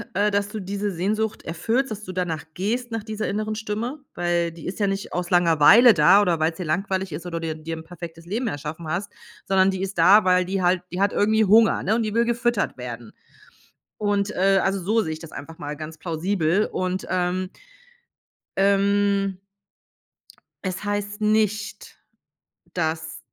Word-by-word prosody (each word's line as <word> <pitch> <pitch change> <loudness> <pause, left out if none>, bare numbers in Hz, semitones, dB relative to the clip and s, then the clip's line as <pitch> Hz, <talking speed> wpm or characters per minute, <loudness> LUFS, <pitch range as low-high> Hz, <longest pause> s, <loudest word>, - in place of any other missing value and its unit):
äh, 205 +1 +2
dass 200 0 0
du 215 - -5
diese 200 +2 -3
Sehnsucht 210 +5 -2
erfüllst, 225 +10 -1
dass 210 0 -6
du 185 - -7
danach 175 -4 -2
gehst, 240 +6 -2
nach 225 -2 -3
dieser 220 -1 -4
inneren 215 +2 -2
Stimme, 220 +6 -4 0.2
Weil 175 -1 0
die 165 0 -12
ist 185 - -5
ja 200 - +2
nicht 195 0 -3
aus 180 0 -2
Langeweile 175 +7 +6
da 170 +6 +6
oder 170 -4 +1
weil's 160 +1 0
dir 180 - -4
langweilig 190 +3 -1
ist 170 +3 -6
oder 170 -1 -3
dir 165 -1 -3
dir 160 +1 -6
'n 160 - -9
perfektes 165 0 -10
Leben 225 +7 -2
erschaffen 155 -1 -5
hast, 175 +6 -3 0.3
sondern 190 0 +3
die 190 0 -2
ist 195 -2 -4
da, 200 +6 +7
weil 180 0 +3
die 190 +1 -2
halt 180 0 +3
die 180 - -4
hat 200 +1 +2
irgendwie 220 +1 +3
Hunger, 220 +3 +5
ne? 210 - +1
Und 230 - +1
die 215 0 -3
will 235 0 +3
gefüttert 235 - 0
werden. 120 -2 -7 0.9
Und, 205 0 0
äh, 195 +1 +3
also 195 0 0
so 215 +5 +1
sehe 160 -6 -2
ich - - -9
das 165 -2 -11
einfach 160 +3 -9
mal 150 +1 -5
ganz 155 +1 -7
plausibel. 170 +3 0
Und, 185 +1 -2
ähm 185 0 -1 1.1
Ähm 200 0 +2 1.3
es 185 +1 -4
heißt 205 0 -3
nicht, 215 -1 0 0.8
dass 160 -2 -2
190 Hz, 180 wpm, -23 LUFS, 170-210 Hz, 1.3 s, da